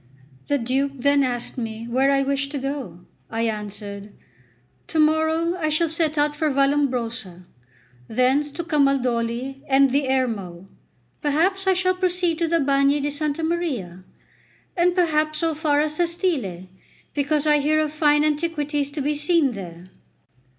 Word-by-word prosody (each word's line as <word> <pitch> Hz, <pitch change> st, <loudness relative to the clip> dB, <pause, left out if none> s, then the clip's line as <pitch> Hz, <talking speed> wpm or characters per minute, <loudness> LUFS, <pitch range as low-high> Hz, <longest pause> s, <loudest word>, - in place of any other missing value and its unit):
The 285 Hz, -, +2 dB
Duke 270 Hz, +3 st, -1 dB
then 280 Hz, +2 st, +2 dB
asked 245 Hz, 0 st, -3 dB
me 225 Hz, 0 st, -5 dB
where 260 Hz, +3 st, +2 dB
I 275 Hz, 0 st, +3 dB
wished 275 Hz, 0 st, -1 dB
to -, -, -2 dB
go. 270 Hz, -, -5 dB, 0.3 s
I 225 Hz, 0 st, -2 dB
answered: 210 Hz, -2 st, -5 dB, 0.8 s
"To -, -, -4 dB
morrow 315 Hz, +2 st, +2 dB
I 315 Hz, -4 st, -1 dB
shall 310 Hz, +2 st, +1 dB
set 320 Hz, -1 st, 0 dB
out 295 Hz, 0 st, +1 dB
for 310 Hz, +1 st, 0 dB
Vallombrosa, 250 Hz, -9 st, 0 dB, 0.6 s
thence 260 Hz, +5 st, +2 dB
to 340 Hz, +4 st, -5 dB
Camaldoli 270 Hz, -4 st, 0 dB
and 270 Hz, -1 st, +4 dB
the 275 Hz, 0 st, +1 dB
Ermo, 200 Hz, -9 st, -2 dB, 0.6 s
afterwards 365 Hz, +7 st, +1 dB
I 380 Hz, -, +5 dB
shall 370 Hz, 0 st, +1 dB
proceed 360 Hz, -2 st, 0 dB
to 335 Hz, -, +1 dB
the 335 Hz, +1 st, +2 dB
Bagni 275 Hz, 0 st, +2 dB
di 290 Hz, +1 st, -2 dB
Santa 300 Hz, +2 st, -2 dB
Maria, 265 Hz, -, -2 dB, 0.7 s
and 355 Hz, 0 st, +2 dB
perhaps 310 Hz, -3 st, +1 dB
so 325 Hz, +1 st, 0 dB
far 300 Hz, -1 st, +1 dB
as 305 Hz, 0 st, -2 dB
Sestile, 325 Hz, -, -1 dB, 0.5 s
because 290 Hz, +1 st, 0 dB
I 300 Hz, -1 st, +4 dB
hear 300 Hz, +2 st, +2 dB
of 305 Hz, -1 st, -1 dB
fine 295 Hz, -1 st, +3 dB
antiquities 295 Hz, -2 st, -1 dB
to 300 Hz, -, -3 dB
be 295 Hz, +2 st, 0 dB
seen 300 Hz, -1 st, +2 dB
there. 180 Hz, -3 st, -9 dB
285 Hz, 150 wpm, -23 LUFS, 250-310 Hz, 0.8 s, I